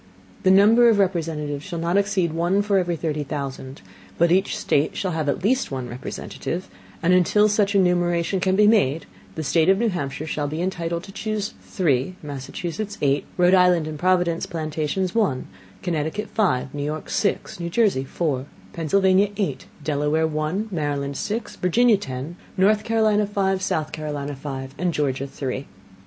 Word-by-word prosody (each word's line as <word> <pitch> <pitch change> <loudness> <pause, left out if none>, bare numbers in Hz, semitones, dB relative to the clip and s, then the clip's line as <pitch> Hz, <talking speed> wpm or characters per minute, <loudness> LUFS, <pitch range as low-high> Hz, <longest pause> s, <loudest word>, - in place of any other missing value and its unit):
The 190 - +3
number 220 +5 +6
of 220 - +4
Representatives 160 -6 -1
shall 180 -4 -5
not 170 +2 -1
exceed 200 -5 +1
one 175 +5 +1
for 200 -1 +2
every 175 -2 -1
thirty 155 -2 -2
Thousand, 135 -1 -6 0.3
but 170 0 +3
each 190 +2 +2
State 145 +2 +1
shall 185 - -1
have 160 -3 -1
at 140 - -2
least 260 +6 +2
one 130 -2 -4
Representative; 130 +8 -5 0.4
and 175 +2 +4
until 195 +4 +4
such 205 -1 +1
enumeration 175 -1 +2
shall 185 0 +2
be 210 +1 +5
made, 165 -9 +3 0.3
the 160 - -3
State 160 +3 +2
of 190 - +5
New 230 +2 +1
Hampshire 145 -5 -4
shall 150 -2 -2
be 155 +3 -4
entitled 170 -2 -2
to 195 - -10
chuse 215 0 -3
three, 155 -2 0
Massachusetts 170 +9 -5
eight, 140 0 +2
Rhode 180 0 +4
Island 180 -3 +5
and 155 -1 -6
Providence 175 -1 +1
Plantations 160 +3 -2
one, 195 - +1 0.4
Connecticut 170 +4 -2
five, 135 - 0
New 145 - -4
York 150 +1 -4
six, 200 -3 -1
New 170 0 -3
Jersey 195 - +2
four, 140 -2 -2 0.3
Pennsylvania 190 +4 +3
eight, 200 -3 -2 0.2
Delaware 150 +2 +1
one, 160 +7 -1
Maryland 145 -4 -2
six, 215 +5 -3
Virginia 225 +5 +4
ten, 140 0 -6 0.2
North 210 +3 +3
Carolina 215 -2 +2
five, 195 -2 0
South 155 -4 -1
Carolina 145 -2 -4
five, 135 -1 -6
and 180 -2 0
Georgia 140 -2 -1
three. 135 0 -4
170 Hz, 165 wpm, -23 LUFS, 150-195 Hz, 0.4 s, number